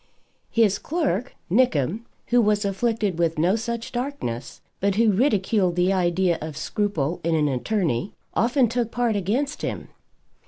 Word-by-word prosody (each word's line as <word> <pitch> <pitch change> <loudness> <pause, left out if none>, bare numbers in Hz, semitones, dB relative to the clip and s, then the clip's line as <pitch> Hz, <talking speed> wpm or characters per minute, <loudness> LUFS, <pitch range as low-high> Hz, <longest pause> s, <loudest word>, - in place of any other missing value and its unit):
His 215 -4 +2
clerk, 275 - -1 0.2
Nickem, 215 - +2 0.2
who 245 0 +5
was 210 -1 +2
afflicted 200 -2 0
with 165 -2 +1
no 175 +6 +3
such 235 +1 -4
darkness, 245 - -4 0.2
but 200 0 +1
who 225 0 +4
ridiculed 200 -5 +2
the 180 +2 +2
idea 175 -1 +1
of 155 -1 -6
scruple 175 -7 -1
in 165 0 +1
an 150 -1 +2
attorney, 155 - -1 0.2
often 245 +2 +3
took 235 0 -1
part 240 -2 0
against 235 - -1
him. - - -4
205 Hz, 145 wpm, -24 LUFS, 175-235 Hz, 0.2 s, who